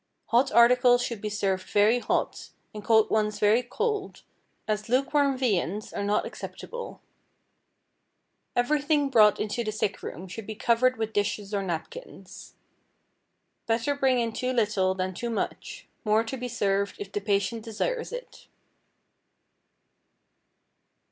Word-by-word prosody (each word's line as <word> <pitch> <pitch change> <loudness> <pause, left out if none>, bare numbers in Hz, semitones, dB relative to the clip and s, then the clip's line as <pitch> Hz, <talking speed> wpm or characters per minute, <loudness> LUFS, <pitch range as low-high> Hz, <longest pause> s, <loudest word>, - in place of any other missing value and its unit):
Hot 240 +3 +3
articles 245 +1 +5
should 230 -4 -4
be 215 - -3
served 195 -2 -2
very 210 +4 +4
hot, - - -2 0.2
and 210 -1 -8
cold 220 0 +4
ones 210 -1 +1
very 215 +4 +4
cold, 415 - -3 0.4
as 215 0 -2
lukewarm 275 +2 +2
viands 210 -5 -1
are 200 - -3
not 205 +1 +1
acceptable. 485 0 -8 1.6
Everything 290 +2 +1
brought 215 -4 +5
into 215 +3 -2
the 215 - -2
sick 210 -2 -2
room 185 +3 -7
should 200 +3 -8
be 220 - -5
covered 245 +3 +2
with 220 0 -3
dishes 205 0 -1
or 200 - 0
napkins. 190 - -7 1.1
Better 230 +5 +1
bring 265 -2 +2
in 230 -2 -1
too 255 +2 -2
little 205 -5 +1
than 185 0 -2
too 235 +6 -4
much, 225 - -4 0.2
more 215 0 +3
to 230 +3 -5
be 250 -1 -5
served 200 -4 0
if 200 -1 -7
the 205 - -3
patient 205 +2 0
desires 465 - -3
it. - - -9
225 Hz, 135 wpm, -27 LUFS, 205-250 Hz, 1.6 s, articles